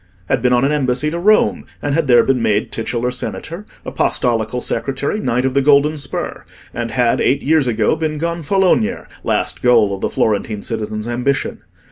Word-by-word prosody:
—had - - +1
been 125 - +2
on 125 +1 +3
an 140 - +1
embassy 145 +1 0
to 170 - -3
Rome, 210 +4 +3 0.2
and 145 - -2
had 160 -1 +1
there 120 -2 +6
been 130 -2 +1
made 105 -1 0
titular 120 +2 -2
Senator, 170 +9 -6 0.2
Apostolical 115 0 0
Secretary, 135 - -2
Knight 125 - 0
of 130 - 0
the 140 - +3
Golden 145 +2 +4
Spur; 140 -3 -4 0.3
and 120 0 -3
had, 120 -1 +1
eight 135 +2 +1
years 155 -2 +2
ago, 110 0 +1
been 155 -1 -2
Gonfaloniere—last 170 - -1
goal 115 -5 +4
of 95 - -6
the - - 0
Florentine 105 -1 -1
citizen's 110 -1 -4
ambition. 125 +3 -1
130 Hz, 170 wpm, -18 LUFS, 115-150 Hz, 0.3 s, there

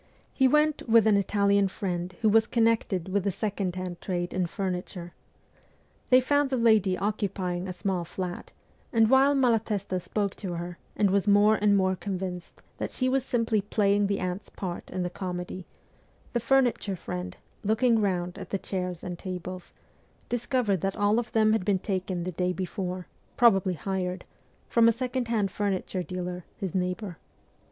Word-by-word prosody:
He 265 - +4
went 300 -1 +2
with 225 -1 +6
an 215 -2 +5
Italian 200 0 +3
friend 180 -2 -4
who 220 - +5
was 220 +1 +4
connected 225 -6 +1
with 200 0 0
the 200 - +1
second 195 -2 -2
hand 180 -2 -5
trade 175 -2 -2
in 185 -1 0
furniture. 180 -1 -4 1.0
They 255 - +7
found 285 +2 +2
the 260 - 0
lady 215 -5 +4
occupying 190 -3 -2
a - - -3
small 185 -1 -2
flat, 180 +1 -6 0.4
and 225 0 +4
while 270 +2 +5
Malatesta 220 -7 +1
spoke 200 +2 -2
to 185 -4 -4
her 175 0 -6 0.2
and 200 -3 +2
was 200 +1 +1
more 205 +1 +6
and 205 -1 +3
more 190 -1 +2
convinced 185 -2 -5 0.2
that - - -2
she 255 -1 0
was 265 0 +1
simply 230 -4 +1
playing 205 0 +2
the 200 0 -1
aunt's 185 +2 -4
part 180 -3 -6
in 185 -1 -2
the 175 - -3
comedy, 180 -1 -5 0.7
the 240 - +1
furniture 240 -5 +2
friend, 90 - -6 0.3
looking 225 +2 +3
round 180 -3 -1
at - - -8
the 195 - 0
chairs 180 -3 -4
and 180 -2 -5
tables, 185 -1 -6 0.6
discovered 240 - 0
that 195 0 -1
all 205 +2 +3
of 240 0 -5
them 215 -1 +4
had 220 - +1
been 200 0 +2
taken 185 -2 -2
the 185 - -3
day 180 +1 0
before 185 -1 -4 0.3
probably 195 -6 +4
hired 185 +1 -3 0.4
from 230 -1 +4
a - - +7
second 250 +1 -2
hand 210 -4 0
furniture 195 -2 -2
dealer, 180 0 -5
his 190 -5 -4
neighbour. 180 0 -2
195 Hz, 170 wpm, -27 LUFS, 180-220 Hz, 1.0 s, They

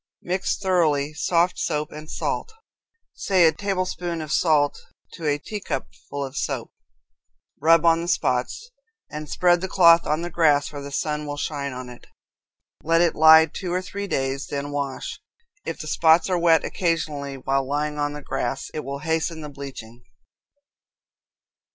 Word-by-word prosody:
Mix 185 +2 -1
thoroughly 155 -7 +1
soft 170 +3 +1
soap 150 -1 -2
and 155 +1 -10
salt 460 - -3 0.6
say 185 -3 +3
a 160 - +6
tablespoonful 175 -1 -3
of 155 - -7
salt 150 -4 +2 0.3
to 165 -3 -5
a 145 -1 +2
teacupful 145 -5 -5
of 135 +1 -9
soap, - - -3 0.9
rub 165 +1 +5
on 165 0 +4
the 170 - -5
spots, 130 - -1 0.4
and 150 0 -6
spread 175 -1 +3
the 190 - -2
cloth 170 -2 +5
on 155 +3 0
the 175 - -5
grass 150 -4 +3
where 145 - -6
the 140 0 -8
sun 150 +1 -2
will 145 0 -4
shine 145 -2 -3
on 130 0 -7
it. 125 -1 -13 0.7
Let 165 +1 +2
it 170 -1 +3
lie 160 0 +8
two 175 +3 -6
or 180 +1 0
three 200 +2 -5
days, 135 -4 -2
then 145 0 -4
wash. 140 -2 -4 0.4
If - - -4
the 155 - -6
spots 160 +3 +3
are 180 - +2
wet 165 -1 +4
occasionally 150 -5 -2
while 135 0 -1
lying 150 +1 -2
on 145 0 -1
the 150 -1 -8
grass, 135 0 -3
it 155 - -4
will 140 +1 -5
hasten 160 0 -1
the 150 - -7
bleaching. 130 -5 -9
155 Hz, 165 wpm, -23 LUFS, 140-170 Hz, 0.9 s, lie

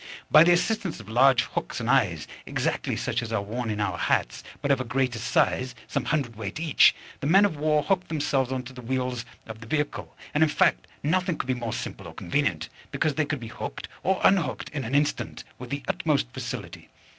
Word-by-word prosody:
By 155 +1 +9
the 175 - +5
assistance 190 - 0
of 110 - -11
large 125 +2 +5
hooks - - -4
and 115 - -3
eyes, 105 - +2 0.2
exactly - - -1
such 120 - -1
as 115 -1 -6
are 105 -3 0
worn 115 +3 -3
in 105 -1 -2
our 105 - -1
hats, - - 0 0.2
but 140 -1 0
of 135 -1 +3
a - - -1
greater 125 -1 -1
size, 130 +1 +1
some - - -2
hundredweight 115 -7 -2
each, 160 -3 +5 0.2
the 140 - -2
men 195 +6 +6
of 200 - 0
war 150 0 +2
hooked 185 0 +1
themselves 145 -4 0
on 130 -1 -2
to 130 +1 -10
the 125 - -9
wheels 125 0 -2 0.2
of 110 0 -9
the 115 - -10
vehicle: 150 +3 -2 0.2
and, 150 - +1
in 160 - +5
fact, - - +2 0.2
nothing 180 +2 +1
could - - -3
be 130 - +1
more 120 -2 -4
simple - - -5
or - - -11
convenient, - - -1 0.2
because 155 - 0
they 155 +1 +1
could 145 -1 -2
be 115 -2 -7
hooked - - -6
or 190 0 +1
unhooked 175 -9 +2
in 145 -3 -4
an 125 +5 -2
instant 145 +1 0 0.2
with 125 -1 -8
the 140 +2 -3
utmost - - +1
facility. - - -6
130 Hz, 215 wpm, -26 LUFS, 120-155 Hz, 0.2 s, By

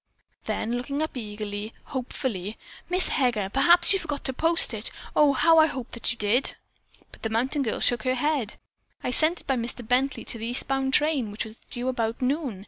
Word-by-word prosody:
Then 225 - -3
looking 280 +4 -3
up 315 - -5
eagerly, 210 -2 -6
hopefully, 230 -6 -5 0.3
"Miss 365 +1 +4
Heger, 235 -8 0
perhaps 340 +7 +6
you 390 - +1
forgot 290 -5 -4
to 265 - -1
post 330 +5 +4
it. - - -4 0.3
Oh, 295 -2 +5
how 325 +4 +5
I 315 - +6
hope 260 -5 -6
that 235 - -2
you 240 - -5
did!" 220 +6 +1 0.6
But - - -16
the 225 - -2
mountain 255 +6 0
girl 235 -5 -2
shook 240 - +2
her 255 0 0
head. 270 -5 -1 0.5
"I - - -1
sent 315 +6 +3
it - - -27
by 265 -2 0
Mr. 235 0 -3
Bently 260 +3 0
to 230 - 0
the 225 - -4
eastbound 265 +2 0
train, 295 -7 +2
which 210 +3 -5
was 220 0 -12
due 245 0 -5
about 230 -3 -2
noon. 265 - -2
255 Hz, 200 wpm, -25 LUFS, 225-290 Hz, 0.6 s, perhaps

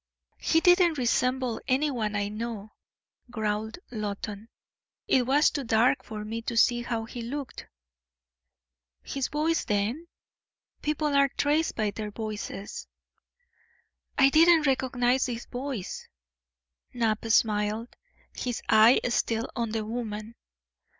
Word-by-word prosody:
"He 325 - +2
didn't 355 -3 +5
resemble 250 -1 0
anyone 255 -6 0
I 205 0 0
know," 215 0 -5 0.6
growled 220 -1 -2
Loton. 210 0 -5 0.6
"It 250 -2 +3
was 290 +3 +4
too 285 - -3
dark 230 +1 +2
for 210 -1 -7
me 225 +2 -4
to 230 0 -4
see 240 +1 +4
how 230 -2 -3
he 235 +2 -7
looked." 270 +4 -6 1.4
"His 275 -1 -2
voice, 315 +3 0
then? 215 +11 -1 0.7
People 300 0 -1
are 280 0 +5
traced 295 +4 0
by 215 -2 0
their 210 0 -5
voices." 210 -2 -6 1.3
"I 270 0 +6
didn't 325 +1 +5
recognise 255 -1 +1
his 240 -1 -5
voice." 250 -6 -5 0.9
Knapp 225 -3 0
smiled, 215 0 +1 0.4
his 245 -2 -3
eye 220 +3 +6
still 230 -1 0
on 235 -2 -1
the 220 0 -2
woman. 220 -1 -5
235 Hz, 115 wpm, -27 LUFS, 215-270 Hz, 1.4 s, I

